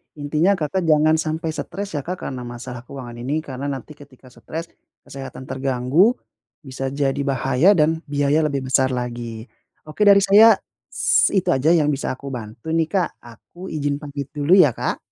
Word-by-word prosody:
Intinya 155 +6 +1
Kakak 170 +2 -2
jangan 155 0 +4
sampai 160 +1 -2
stres 195 +5 -5
ya, - - -2
Kak, 180 +1 -5
karena 125 -2 -5
masalah 120 0 -8
keuangan 125 -4 -9
ini. 140 +6 -2
Karena 135 -2 -6
nanti 140 +1 -5
ketika 130 -2 -16
stres, 165 +6 -7 0.3
kesehatan 135 -1 -9
terganggu, 135 - +2 0.5
bisa 135 -1 -5
jadi 140 -1 0
bahaya 135 +7 +3
dan 160 0 +2
biaya 145 +2 +1
lebih 140 -2 -2
besar 130 0 +3
lagi. 120 -2 -5 0.4
Oke 155 +7 -9
dari 200 0 +8
saya 215 +3 +7 0.3
s - - +3
itu 190 - +2
saja 135 +2 +2
yang 150 -3 +2
bisa 135 - -3
aku 140 +2 -9
bantu 115 +6 -7
nih, 165 -1 +2
Kak, 190 -3 +1 0.2
aku 145 - -12
ijin 145 -1 -1
pamit 140 -2 -6
dulu 150 +3 +1
ya, 180 -7 +7
Kak. - - -2
145 Hz, 170 wpm, -21 LUFS, 130-160 Hz, 0.5 s, dari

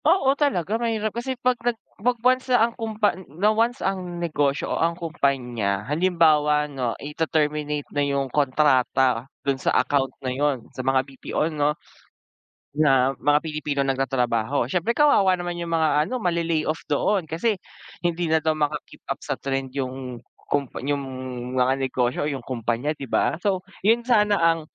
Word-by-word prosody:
Oo, 310 -4 +4
talaga 230 - 0
mahirap. 220 -2 -1
Kasi 255 +2 -3
'pag 255 0 +2
nag 240 -1 0 0.2
'pag 245 +2 +2
once 255 +1 +3
ang 235 -2 +3
kumpan 215 -5 -1 0.2
na 210 +4 +3
once 230 +3 0
ang 185 -2 -2
negosyo 150 -4 0
o - - -1
ang 170 +1 +1
kumpanya, 125 - -1
halimbawa 150 -1 +3
'no, 130 -5 -3
ite-terminate 150 -1 -1
na 145 - +1
yung 140 -1 0
kontrata 130 -3 +2 0.2
dun 135 -2 0
sa - - +1
account 135 0 +2 0.2
na 130 - -1
yun, 140 -3 0
sa - - -4
mga 130 0 +2
BPO 145 +3 -3
'no, 150 0 +1 1.0
na 135 -3 +4
mga 145 +3 +3
Pilipinong 150 -3 -1
nagtatrabaho. 125 -1 0
Siyempre 185 +7 0
kawawa 205 -11 +5
naman 175 -1 -4
yung 170 - -4
mga 155 -2 +2
ano, 255 - -3
male-lay 170 -3 +1
off 155 +1 -2
doon. 170 +4 +1
Kasi 185 +6 -1 0.4
hindi 175 -1 -1
na 160 - +4
daw 155 0 0
maka-keep 150 -1 -3
up - - -3
sa - - -3
trend 135 -1 -3
yung 130 -2 -5 0.2
kumpa 140 -3 -1
yung 140 +1 -1 0.6
mga 130 +1 +3
negosyo 130 -1 -1
o 150 - 0
yung 135 -4 -6
kumpanya, 125 +4 -2
di 140 - -8
ba? - - +2
So, 190 -3 0 0.2
yun 230 +3 +3
sana 210 -4 +4
ang, 165 0 +3
150 Hz, 160 wpm, -24 LUFS, 135-185 Hz, 1.0 s, kawawa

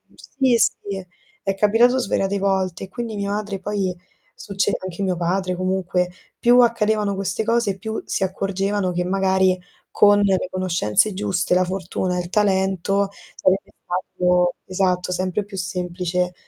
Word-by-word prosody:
sì 265 -3 0
sì, 195 -3 -1 0.4
è 195 - 0
capitato 230 +6 +4
svariate 200 -3 0
volte 190 -2 0
e - - -18
quindi 230 0 -5
mia 200 0 -2
madre 205 -2 -3
poi, 195 -2 -2 0.4
succe 200 -2 -1
anche 185 +1 -5
mio 185 -2 0
padre 180 +1 0
comunque. 185 -1 0 0.3
Più 245 +1 +5
accadevano 215 -3 +2
queste 195 +2 -2
cose, 230 -4 +1
più 220 +3 -4
si 195 - -1
accorgevano 195 0 -1
che 180 +1 0
magari 190 0 +2 0.3
con 205 0 +5
le 190 -2 +2
conoscenze 185 - +1
giuste, 190 -2 0
la 185 0 +3
fortuna, 180 0 -2
il 175 -1 -3
talento, 195 -1 +1 0.3
sarebbe 190 +1 +1
stato 180 0 +1
esatto 185 -1 0
sempre 185 +3 -1
più 200 -2 -9
semplice 180 -1 -2
190 Hz, 140 wpm, -22 LUFS, 185-205 Hz, 0.4 s, Più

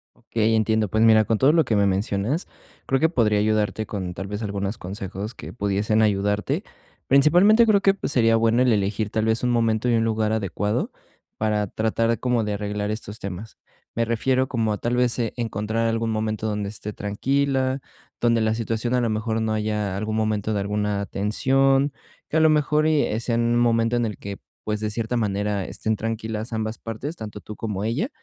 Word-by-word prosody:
Okey, 110 0 0
entiendo, 110 -1 +2
pues 110 +3 +2
mira, 110 -1 +6
con 110 0 +1
todo 135 +5 +5
lo 165 -1 +4
que 115 - 0
me 100 -1 +3
mencionas, 100 - -1 0.4
creo 135 -1 +2
que 160 - +3
podría 110 -9 +2
ayudarte 110 0 0
con, 95 -4 -4
tal 95 +2 -6
vez, 105 +2 -5
algunos 100 0 -3
consejos 100 +3 -6
que - - -9
pudiesen 105 +1 +1
ayudarte, 105 0 +1 0.4
principalmente, 175 - +6
creo 205 -3 +4
que, 195 -1 +4
pues, 195 - -4
sería 115 -2 +4
bueno 115 +2 +3
el 125 -3 +3
elegir, 105 +1 -1
tal 110 0 0
vez, 110 +2 +1
un 125 - +2
momento 115 0 +1
y 120 - +3
un 115 - +2
lugar 110 -1 0
adecuado, 105 0 -1 0.5
para 105 -1 0
tratar 115 +3 0
como 125 -3 +1
de 105 - -2
arreglar 105 0 -3
estos 110 -1 -6
temas, 100 +3 -7 0.4
me 115 - +1
refiero 130 +3 +1
como 110 -3 0
a, - - -3
tal 120 +3 -1
vez, 125 0 +2
e 115 -2 -1
encontrar 115 0 -1
algún 115 0 0
momento 110 0 -2
donde 105 -2 -2
esté 105 0 -6
tranquila, 130 +6 0 0.4
donde 115 -1 +2
la 110 0 +1
situación, 115 +2 -1
a 125 - +2
lo 115 - 0
mejor, 110 +1 -1
no 110 -1 0
haya 105 -2 -1
algún 110 +2 -2
momento 110 -1 0
de 105 - 0
alguna 105 0 -1
tensión, 135 +8 +2 0.3
que - - -5
a - - +5
lo 160 0 +5
mejor 150 0 +2
y 145 -8 +1
sea 120 -1 -1
en 115 - +2
un 120 0 +2
momento 115 0 +2
en 120 -1 +1
el 105 - -4
que, 100 -1 -7 0.3
pues, 105 -1 -1
de 110 - -1
cierta 115 +2 -2
manera, 105 -2 -1
estén 110 0 -2
tranquilas 110 0 -4
ambas 110 0 -3
partes, 115 +8 -6
tanto 105 -7 -8
tú 105 0 -9
como 105 -3 -4
ella, 140 - -1
110 Hz, 200 wpm, -23 LUFS, 105-120 Hz, 0.5 s, mira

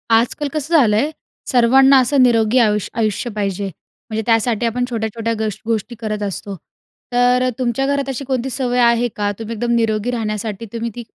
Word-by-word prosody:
आजकाल 250 +6 +1
कसं 310 +2 -3
झालंय 230 +2 +3 0.4
सर्वांना 265 +3 +6
असं 265 +2 +2
निरोगी 230 -1 +3
आयुष 210 -3 +1
आयुष्य 225 +1 -1
पाहिजे. 200 -1 -2 0.4
म्हणजे 220 0 -2
त्यासाठी 230 0 +1
आपण 245 +2 0
छोट्या-छोट्या 230 0 -2
गश् 215 -3 -2
गोष्टी 230 +1 -2
करत 215 -2 -3
असतो. 200 0 -5 0.6
तर 250 +1 +3
तुमच्या 255 +1 0
घरात 280 -1 -1
अशी 270 +1 -4
कोणती 260 -1 -2
सवय 250 -1 -1
आहे 235 0 +3
का? 205 -1 -1
तुम्ही 225 +1 -5
एकदम 235 +2 -2
निरोगी 225 0 0
राहण्यासाठी 215 -2 -3
तुम्ही 230 0 -3
ती 240 - -6
235 Hz, 165 wpm, -18 LUFS, 215-250 Hz, 0.6 s, सर्वांना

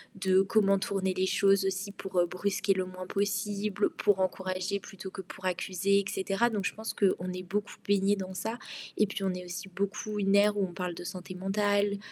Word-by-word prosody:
de 190 -1 +4
comment 195 -1 +3
tourner 190 -1 0
les 185 0 +1
choses 195 0 +4
aussi 195 +1 -2
pour, 195 -2 -6
heu, 175 - +5
brusquer 195 +3 0
le 185 -1 -1
moins 185 0 -7
possible, 200 +1 0
pour 205 -2 +2
encourager 185 +1 -1
plutôt 195 -1 -9
que 190 - -6
pour 185 +1 -11
accuser 190 +2 +2
et 200 - -2
cetera. 195 +4 +1
Donc, 205 -4 -2
je - - 0
pense 220 +1 -5
qu'on 185 -2 +1
est 185 0 -5
beaucoup 205 +3 -3
baignés 200 0 +3
dans 190 -1 -5
ça 220 +5 -3 0.4
et 215 - +5
puis, 200 0 -4
on 190 - +1
est 180 0 -6
aussi 180 +2 -6
beaucoup 200 +3 -3
une 195 -1 +2
ère 205 +1 +5
où 200 - +2
on 175 - -11
parle 180 -1 -3
de - - -7
santé 185 +1 -6
mentale, 205 +1 +1
195 Hz, 215 wpm, -30 LUFS, 185-205 Hz, 0.4 s, heu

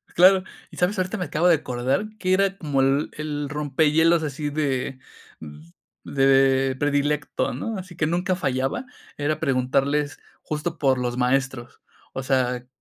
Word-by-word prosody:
Claro. 185 +2 +6 0.3
¿Y - - -13
sabes? 180 +3 +1
Ahorita 185 +4 -1
me 180 - -2
acabo 160 +3 +1
de 170 - +6
acordar 130 +6 -1
que 185 0 +1
era 195 0 +2
como 145 -6 0
el 135 +3 +2
el 150 -2 -4
rompehielos 155 +3 +2
así 145 0 -3
de 135 -3 -2 1.0
de 135 -1 +3
predilecto, 145 0 0
¿no? 205 - -4
Así 180 -1 -9
que 155 -2 0
nunca 180 +3 0
fallaba, 135 - -1 0.3
era 145 +1 -1
preguntarles 140 +1 0 0.2
justo 155 +2 -4
por 135 -2 +3
los 125 0 -2
maestros. 130 -1 -1 0.3
O 135 - -4
sea, 125 -2 +1
q 125 - -28
145 Hz, 150 wpm, -24 LUFS, 135-165 Hz, 1.0 s, Claro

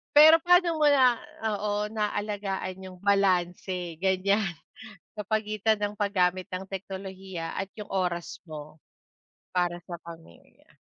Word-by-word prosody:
Pero 315 +2 +9
paano 355 -2 +4
mo 300 - +5
na 255 -4 +5 0.3
oo, 210 0 -1
naalagaan 205 -3 -2
yung 185 -1 -10
balanse 180 -3 +1
gan'yan, 195 +2 +2 0.6
sa 210 - -5
pagitan 215 +1 0
ng 205 0 -2
paggamit 185 -3 +1
ng 185 +1 -5
teknolohiya 190 -3 -6
at 195 0 -3
yung 210 - -7
oras 175 -3 -2
mo, 155 0 -9 0.7
para 175 -1 0
sa 175 - -4
pamilya? 165 - -15
195 Hz, 120 wpm, -27 LUFS, 180-210 Hz, 0.7 s, Pero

